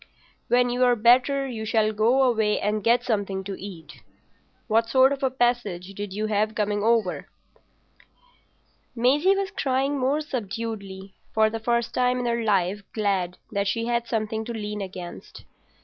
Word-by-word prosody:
When 245 0 +3
you're 245 0 +3
better 255 +4 +3
you 230 -4 -5
shall 220 -1 +1
go 235 +6 +3
away 220 -4 +2
and 210 0 -1
get 235 +2 +3
something 200 -4 -2
to 195 0 -5
eat. 165 -7 -10 0.7
What 225 0 +2
sort 265 +2 +5
of 275 - -6
a 265 - +2
passage 240 -8 -1
did 205 0 -6
you 210 +3 -2
have 215 0 0
coming 205 -1 0
over?" 225 -5 +1 1.7
Maisie 290 +11 +3
was 395 0 -2
crying 275 -5 0
more 275 +4 +1
subduedly, 205 -7 -5 0.2
for 220 0 +4
the 225 - -4
first 235 +1 0
time 250 0 +2
in 250 - -2
her 235 -1 0
life 200 -1 +1
glad 195 -5 -1
that 200 -1 -1
she 230 +3 -1
had 235 0 -1
something 220 -1 -2
to 235 - -5
lean 210 -1 -4
against. 185 -2 -8
225 Hz, 160 wpm, -25 LUFS, 205-245 Hz, 1.7 s, sort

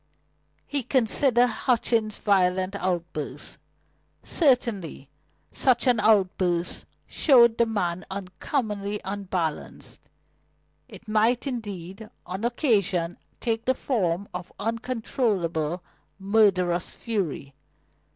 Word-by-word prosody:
He 285 -1 -1
considered 245 0 +4
Hutchings' 230 -2 0
violent 185 -1 +1
outburst. 175 -5 -4 0.6
Certainly 230 - +1 0.4
such 255 -1 +2
an 245 -4 +4
outburst 185 -4 +2 0.2
showed 235 -6 +5
the 235 - +4
man 180 -5 -2
uncommonly 200 +2 -3
unbalanced; 190 -5 -4 0.9
it 230 - -13
might, 220 +4 +2
indeed, 210 -5 -6 0.2
on 190 +4 -5
occasion 200 - +1 0.2
take 225 -1 -2
the 260 - +2
form 200 -8 -1
of 180 0 -6
uncontrollable 210 - -1 0.3
murderous 190 -4 +2
fury. 180 - -3
205 Hz, 85 wpm, -25 LUFS, 180-235 Hz, 0.9 s, showed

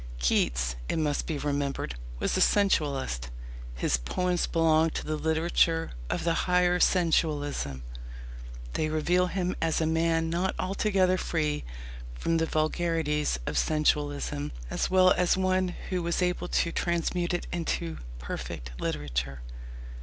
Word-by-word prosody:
Keats, - - +1
it - - 0
must 150 -2 0
be 160 - -2
remembered, 140 - -2 0.2
was - - -1
a - - +2
sensualist. 140 - +2 0.5
His 65 +1 +1
poems 175 - -1
belong 165 -1 +3
to - - -5
the 155 - -1
literature 165 +1 +1 0.2
of - - -1
the 170 0 +2 0.2
higher 180 0 +3
sensualism. 145 - +1 0.9
They 155 - 0
reveal 175 +4 +2
him 180 0 -1
as 165 -1 +1
a 160 - +1
man 165 0 +1
not 175 +3 0
altogether 185 -1 +1
free 150 - -1 0.5
from 165 - 0
the 165 0 +1
vulgarities 155 - 0
of - - 0
sensualism, 145 -1 0 0.2
as - - 0
well 185 0 +5
as 180 0 +3
one 185 0 +2 0.2
who 180 -1 0
was 170 +2 0
able 180 0 -1
to 170 - +1
transmute 170 +1 0
it 175 - -3
into 170 -1 -2 0.2
perfect - - -6
literature. 70 -2 -2
160 Hz, 135 wpm, -28 LUFS, 145-175 Hz, 0.9 s, well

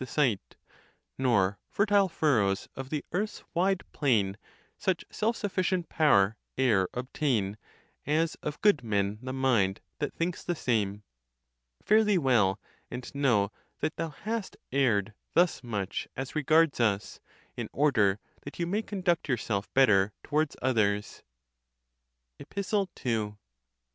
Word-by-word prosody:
479 130 -6 0 0.7
Nor 100 -7 +2
fertile 205 -2 +3
furrows 110 - +1
of 135 0 -6
the 150 -1 -3
earth's 205 +5 -2
wide 185 +2 +1
plain 105 -9 +1 0.4
Such 190 -4 -1
self 225 +2 0
sufficient 185 -3 -1
power 110 -9 +4 0.2
e'er 110 -8 +3
obtain, 125 -5 -1 0.3
\ - - -36 0.2
As 165 - -3
of 150 0 -4
good 205 -11 +4
men 100 -1 0
the 130 0 -5
mind, 120 -8 +2 0.2
that 145 - -1
thinks 170 +1 -2
the 175 - -1
same.! 105 -7 -1 0.8
Fare 215 +1 +5
thee 210 -3 +3
well, 115 - +3 0.3
and 125 +1 -7
know 120 -8 +2 0.3
that 155 - -1
thou 165 -1 -2
hast 210 +8 -5
erred 110 -6 +2 0.2
thus 175 -4 +3
much 105 -5 -3
as 135 +3 -5
regards 155 0 +3
us, 105 -4 0 0.4
in - - -4
order 105 -9 +3 0.2
that 140 - -9
you 170 - 0
may 200 +5 0
conduct 180 -7 -1
yourself 110 -5 -1
better 105 -7 +5
to - - -17
wards 155 0 +1
others. 105 -5 +1 1.2
EPISTLE 200 0 -2 0.2
II. 110 -4 0
135 Hz, 135 wpm, -29 LUFS, 105-170 Hz, 1.2 s, Fare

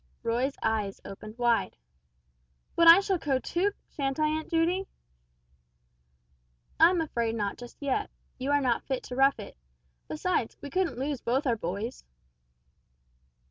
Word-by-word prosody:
Roy's 245 +4 0
eyes 215 -3 -1
opened 215 +3 -9
wide. 240 -1 +1 1.0
"But 335 - +5
I 335 +4 +10
shall 385 -3 0
go 275 -4 +1
too, 355 +9 0 0.2
shan't 275 0 -2
I, 305 0 +3
Aunt 310 +1 -3
Judy?" 345 +3 +1 1.9
"I 330 - +8
am 355 -2 +1
afraid 235 -7 -1
not 205 -3 -2
just 245 -1 -11
yet. 285 +9 -1 0.3
You 260 +2 -3
are 290 0 +3
not 245 -3 +1
fit 265 -2 -2
to 250 - -7
rough 270 +1 +4
it; 205 - -9 0.5
besides 310 -6 -1
we 285 - -8
couldn't 370 -7 0
lose 275 0 -2
both 260 +5 0
our 240 -3 +2
boys!" 205 +5 -5
270 Hz, 145 wpm, -28 LUFS, 235-325 Hz, 1.9 s, I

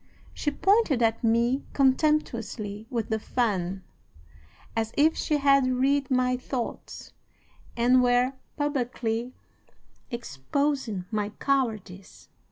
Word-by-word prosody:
She 295 - -1
pointed 340 - +2
at 225 +1 +1
me 235 +4 +2
contemptuously 240 -7 0
with 230 -5 -3
the 220 -1 0
fan, 195 -6 -1 0.9
as 225 0 -1
if 310 +3 +4
she 300 - 0
had 275 -2 +4
read 270 +2 +1
my 250 -1 +2
thoughts 250 -1 -6 0.6
and 250 +2 +4
were 245 +1 +3 0.2
publicly 245 -5 -2 0.8
exposing 235 - -2
my 210 -1 -1
cowardice. 215 -7 -3
245 Hz, 100 wpm, -27 LUFS, 220-275 Hz, 0.9 s, if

